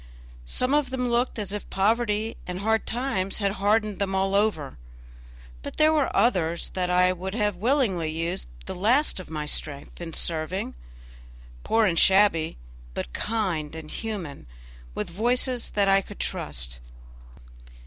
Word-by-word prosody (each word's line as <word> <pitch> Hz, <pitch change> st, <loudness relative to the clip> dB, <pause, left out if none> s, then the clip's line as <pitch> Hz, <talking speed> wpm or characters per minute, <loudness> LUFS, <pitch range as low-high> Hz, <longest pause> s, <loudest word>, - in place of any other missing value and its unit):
Some 255 Hz, -, 0 dB
of 295 Hz, -2 st, +2 dB
them 255 Hz, -1 st, -1 dB
looked 240 Hz, +1 st, +1 dB
as 205 Hz, -2 st, -3 dB
if 210 Hz, -, -5 dB
poverty 215 Hz, +2 st, +1 dB
and 180 Hz, +1 st, -4 dB
hard 220 Hz, +1 st, +1 dB
times 225 Hz, -6 st, -1 dB
had 200 Hz, -2 st, +1 dB
hardened 210 Hz, 0 st, +2 dB
them 195 Hz, -1 st, 0 dB
all 195 Hz, 0 st, +1 dB
over; 200 Hz, -, 0 dB, 0.8 s
but -, -, -7 dB
there 310 Hz, 0 st, +5 dB
were 300 Hz, -3 st, +2 dB
others 180 Hz, -6 st, +1 dB
that 180 Hz, -1 st, -1 dB
I 180 Hz, +1 st, +4 dB
would 190 Hz, +2 st, -5 dB
have 210 Hz, -4 st, 0 dB
willingly 210 Hz, -, +1 dB
used 165 Hz, -, -2 dB, 0.2 s
the -, -, -5 dB
last 230 Hz, +8 st, +2 dB
of 185 Hz, -, -9 dB
my 155 Hz, -2 st, -3 dB
strength 145 Hz, +1 st, -2 dB
in 165 Hz, -2 st, -6 dB
serving; 165 Hz, +4 st, 0 dB, 0.9 s
poor 225 Hz, 0 st, +3 dB
and 170 Hz, -4 st, +2 dB
shabby, 190 Hz, -, +4 dB, 0.4 s
but -, -, -4 dB
kind 180 Hz, -9 st, -1 dB
and 160 Hz, -1 st, -8 dB
human, 190 Hz, -, -5 dB, 0.5 s
with -, -, -2 dB
voices 245 Hz, +5 st, +1 dB
that 200 Hz, -1 st, +1 dB
I 195 Hz, 0 st, +5 dB
could -, -, -12 dB
trust. -, -, -3 dB
195 Hz, 150 wpm, -26 LUFS, 170-225 Hz, 0.9 s, there